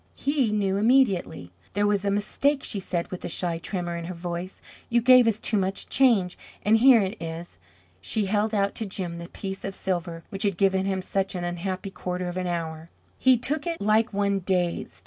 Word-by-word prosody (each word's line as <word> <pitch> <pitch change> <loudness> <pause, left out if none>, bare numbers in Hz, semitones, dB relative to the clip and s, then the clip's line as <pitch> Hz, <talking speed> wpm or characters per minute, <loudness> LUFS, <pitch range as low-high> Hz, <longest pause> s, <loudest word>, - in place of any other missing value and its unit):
He 275 -6 0
knew 200 -2 +1
immediately. 205 - +2 0.2
"There 205 +1 +1
was 205 -1 +1
a 200 - +1
mistake," 270 +8 0
she 205 - -2
said, 175 -2 -3
with 185 - -6
a - - -4
shy 170 -1 -1
tremor 175 0 -3
in 170 0 -5
her 180 +1 -6
voice. 175 +2 -5 0.3
"You 235 - +3
gave 250 0 +6
us 220 -1 +1
too 220 - 0
much 190 0 -2
change 220 -10 +3 0.3
and 215 +2 +5
here 245 -1 +7
it 195 +2 -4
is." 165 +1 -7 0.4
She 205 - 0
held 210 +2 +1
out 200 -2 +1
to 220 - -3
Jim 180 -3 -4
the 170 +1 -8
piece 195 -1 -6
of 195 - -4
silver 170 -3 -3
which 195 - -5
had 200 -4 0
given 190 0 +2
him 190 -1 -1
such 195 +1 -2
an 175 - -3
unhappy 185 +2 -4
quarter 180 -1 -4
of 175 +1 -5
an 185 -1 -2
hour. 165 -2 -4 0.3
He 260 -1 +5
took 285 +7 -2
it 335 -1 -2
like 215 +2 +2
one 200 -1 +1
dazed. 180 -2 -1
195 Hz, 205 wpm, -26 LUFS, 175-215 Hz, 0.4 s, here